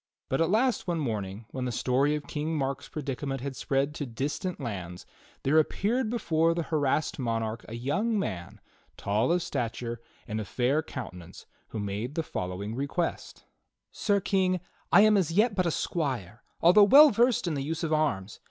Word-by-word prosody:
But 135 - +1
at 165 - +2
last 230 +2 +2
one 175 -1 0
morning, 110 -6 -3
when 130 -1 -3
the 125 - -1
story 135 +5 +1
of 150 - -5
King 155 +2 -3
Mark's 135 -1 -3
predicament 135 -2 -4
had 140 0 -4
spread 140 +2 0
to 145 -2 -4
distant 145 +9 -3
lands, 90 - -6 0.4
there 150 +4 +4
appeared 220 - 0
before 165 -8 +1
the 170 - -1
harassed 150 -1 0
monarch 115 -2 -2
a 115 - -6
young 200 - 0
man, 90 - -4 0.4
tall 105 +8 +1
of 175 -1 +2
stature 115 0 -3 0.3
and 110 0 -2
of 105 - -7
fair 130 +5 +1
counte 130 -9 -7
nance, 90 -1 -12 0.2
who - - -7
made 105 +6 -3
the 165 - 0
following 95 -1 -4
request: 140 +7 -3 0.5
"Sir 200 -1 +1
King, 185 -1 +1 0.3
I - - +8
am 215 0 +6
as 175 -5 +1
yet 210 +6 +3
but 185 -3 +1
a - - +3
squire, 130 - -2 0.2
although 180 +5 +7
well 285 +8 +9
versed 240 +1 +3
in 170 - -1
the 140 - -2
use 160 +4 -3
of 160 -1 0
arms. 125 -11 0
145 Hz, 180 wpm, -28 LUFS, 115-175 Hz, 0.5 s, well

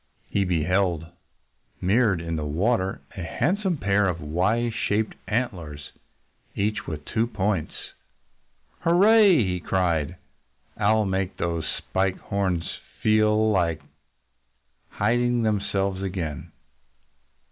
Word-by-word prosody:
He 100 - +1
beheld, 90 0 +1 0.7
mirrored 100 -1 +2
in 85 -1 -3
the 75 - -2
water, 95 - 0
a 95 - -5
handsome 180 - 0
pair 100 -3 +2
of 85 -3 -1
Y 95 +11 0
shaped 110 -1 -1
antlers, 85 - -3 0.6
each 105 +2 -1
with 75 -2 -5
two 115 +1 0
points! 100 -6 -1 1.1
"Hurrah!" 195 +7 +5
he 120 - +4
cried. 85 -2 0 0.6
"I'll 110 +1 +2
make 95 -1 -2
those 85 -2 -2
Spike 95 0 -1
Horns 95 -4 -1 0.4
feel 110 0 +3
like 85 -6 +1 1.1
hiding 120 +3 +1
themselves 100 -2 0
again." 90 -6 -4
95 Hz, 105 wpm, -25 LUFS, 85-110 Hz, 1.1 s, Hurrah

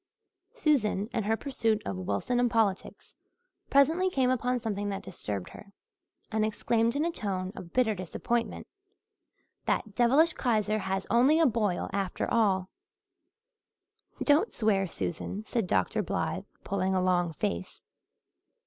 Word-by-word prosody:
Susan, 255 - +1
in 225 - 0
her 220 +1 +1
pursuit 230 -6 0
of 100 - -3
Wilson 100 - -1
and 245 0 +3
politics, 215 -5 -1 0.6
presently 320 +7 +4
came 260 -7 +2
upon 250 0 0
something 205 -3 -3
that 195 -1 -4
disturbed 105 - -5
her 200 - -13 0.6
and 220 -1 +1
exclaimed 230 +2 +1
in 295 +3 +1
a 340 - 0
tone 190 - -3
of 170 - -9
bitter 250 -4 +2
disappointment, 220 +5 -2 1.0
"That 215 -4 0
devilish 270 +9 +4
Kaiser 215 -3 +1
has 190 -1 -2
only 260 +8 +5
a 330 - +5
boil 215 - +1
after 195 -2 -1
all." 195 -5 +2 1.5
"Don't 310 +9 +3
swear, 200 -4 +1
Susan," 190 +5 -4
said 225 -5 -1
Dr. 95 - +1
Blythe, - - -2 0.2
pulling 190 -1 0
a - - +3
long 175 -2 +1
face. 90 - -4
215 Hz, 135 wpm, -29 LUFS, 190-245 Hz, 1.5 s, only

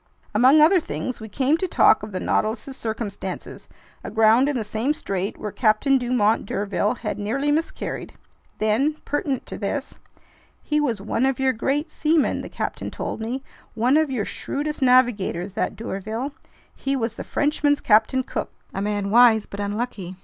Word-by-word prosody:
Among 255 +8 +6
other 355 +5 +6
things, 255 -5 -5
we 220 -1 -8
came 275 +7 +2
to 375 - -2
talk 220 - +5
of 210 0 -7
the 185 - -3
Nautilus's 220 +8 -1
circumstances, 220 -5 -5 0.4
aground 225 +5 +4
in 285 - -1
the 225 - -1
same 220 +8 -1
strait 195 -4 -3
where 210 - -5
Captain 245 +5 +3
Dumont 235 -4 +1
d'Urville 205 +2 -1
had 210 - -3
nearly 270 +8 0
miscarried. 320 +2 -3 0.4
Then, 230 +8 +1
pertinent 280 -2 -2
to - - -7
this: 265 +7 -4 0.6
"He 300 0 +1
was 235 -9 -1
one 220 +4 -1
of 270 -1 +1
your 265 -1 +2
great 285 +7 -1
seamen," 310 -1 +1
the - - -8
captain - - -4
told - - -5
me, 250 +4 -3 0.3
"one 245 +5 +3
of 310 -1 +3
your 240 -6 -1
shrewdest 295 +1 -4
navigators, 235 -8 +2
that 220 - -2
d'Urville! 220 +6 -4 0.4
He 275 0 -2
was 230 -3 -1
the - - -7
Frenchman's 290 0 +1
Captain 235 +4 +3
Cook. - - -4 0.2
A 195 - -3
man 205 -1 -1
wise 230 -2 +6
but 200 - -9
unlucky! 205 -3 -3
240 Hz, 165 wpm, -23 LUFS, 210-275 Hz, 0.6 s, Among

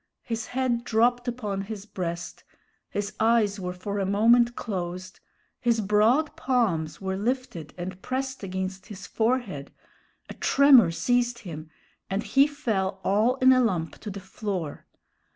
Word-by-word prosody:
His 230 -1 -4
head 250 -2 -1
dropped 245 +2 +2
upon 210 -5 -3
his 205 0 -7
breast, 175 -4 -5 0.5
his 205 0 -3
eyes 220 -2 +3
were 180 -1 -3
for 200 +3 -4
a - - +1
moment 235 +4 +4
closed, 185 -3 -5 0.4
his 235 -2 +2
broad 220 +9 +2
palms 185 - 0
were 190 -1 -3
lifted 210 - -3
and 180 +1 -6
pressed 265 +1 -3
against 190 0 -4
his 205 -2 -9
forehead, 220 - -1 0.6
a - - -8
tremor 270 -9 +6
seized 245 +7 +1
him, 155 -2 -7 0.4
and 195 +2 -1
he 275 +1 +4
fell 210 -10 -2
all 215 +6 +2
in 260 0 +6
a 255 - +4
lump 175 -9 -1
to 215 - -7
the 200 0 -6
floor. 190 -5 -5
210 Hz, 145 wpm, -26 LUFS, 190-245 Hz, 0.6 s, tremor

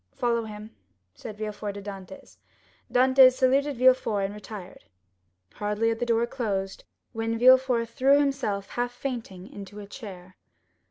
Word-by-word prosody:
"Follow 235 -3 0
him," 210 0 -10 0.4
said 215 -2 -9
Villefort 210 -1 -5
to 200 - -7
Dantès. 200 +7 -10 0.5
Dantès 260 +1 +6
saluted 270 +2 +2
Villefort 255 -5 +3
and 195 - -5
retired. 205 -2 -10 0.7
Hardly 210 +2 -1
had 225 0 -2
the 240 - -2
door 230 0 +2
closed 200 -6 -4 0.3
when 225 0 -2
Villefort 255 -1 +5
threw 270 +5 +3
himself 240 -9 -1
half 245 0 -2
fainting 235 -8 -6
into 205 0 -10
a 205 - -8
chair. 190 -4 -11
225 Hz, 140 wpm, -26 LUFS, 205-255 Hz, 0.7 s, Dantès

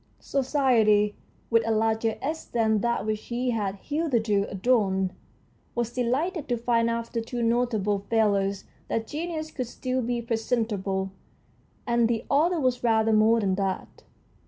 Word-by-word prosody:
Society, 235 -7 +2 0.4
with 230 0 +5
a 225 - -2
larger 220 0 +1
S 315 +3 -3
than 220 -2 +1
that 235 0 0
which 215 0 -2
he 245 +1 -1
had 205 -4 -1
hitherto 230 -6 0
adorned, 190 -3 +1 0.6
was 240 0 -1
delighted 275 +7 -1
to 240 - +1
find 230 0 +1
after 230 0 -2
two 235 +1 -4
notable 230 -4 +1
failures 200 -3 +1 0.2
that 225 - -1
genius 315 +2 -4
could 255 -3 -4
still 255 +1 -2
be 240 0 -1
presentable, 220 -5 -1 0.7
and 235 -1 +3
the 230 -1 -1
author 325 +5 +3
was 255 -3 0
rather 225 -1 +3
more 220 +2 +5
than 195 -2 +1
that. 195 0 -3
230 Hz, 140 wpm, -26 LUFS, 215-250 Hz, 0.7 s, with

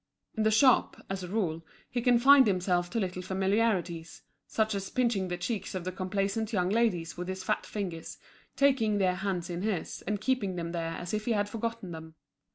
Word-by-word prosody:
In 220 - -1
the 215 - +4
shop, 240 +4 +4
as 195 -1 -3
a - - -5
rule, 175 -5 -1 0.2
he 245 - -2
confined 255 +2 +6
himself 180 -2 +1
to 230 - -1
little 185 -2 -2
familiarities, 190 -3 0 0.2
such 220 0 0
as 195 -1 -3
pinching 230 -7 +1
the 175 0 -3
cheeks 195 +2 -3
of 185 - -3
the 185 - -3
complaisant 195 +4 -2
young 180 -4 +1
ladies 190 -8 +1
with 180 0 -4
his 190 0 -4
fat 210 +3 -1
fingers, 180 -6 -5 0.4
taking 260 -7 +3
their 185 -2 +2
hands 190 -3 -2
in 175 +1 -3
his 205 -4 -2
and 205 0 0
keeping 215 -7 0
them 170 -1 -3
there 165 -1 -3
as 175 +2 -6
if 215 0 -1
he 235 - +2
had 205 -1 +1
forgotten 230 -3 -4
them. 160 -1 -9
195 Hz, 195 wpm, -29 LUFS, 180-220 Hz, 0.4 s, confined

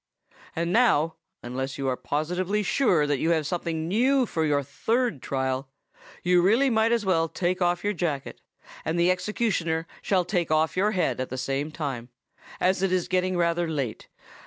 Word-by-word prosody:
And 170 +2 -1
now, 165 -10 +3 0.3
unless 130 +2 -4
you 135 -1 -2
are 130 - +1
positively 180 +10 -1
sure 180 - +2
that 145 -2 0
you 165 - +1
have 160 -2 0
something 165 -1 -2
new 255 +7 +3
for 160 -7 -2
your 145 -1 +1
third 225 - -1
trial, 130 +1 -2 0.5
you 180 0 +4
really 230 +9 +3
might 220 0 +3
as 235 -3 +1
well 165 -3 +2
take 180 +2 -1
off 175 0 +1
your 205 0 0
jacket; 160 -7 -3 0.4
and 165 +2 -1
the 175 +1 +4
executioner 180 -5 -1 0.2
shall 185 -3 +1
take 175 -3 -1
off 155 -1 +2
your 205 +3 +2
head 155 - 0
at 130 - -4
the 130 - -5
same 135 +3 -2
time, 135 -7 -5 0.5
as 185 0 +2
it 195 -1 +1
is 185 -2 +1
getting 185 0 0
rather 170 0 +1
late. 140 -8 -3
170 Hz, 180 wpm, -26 LUFS, 145-190 Hz, 0.5 s, you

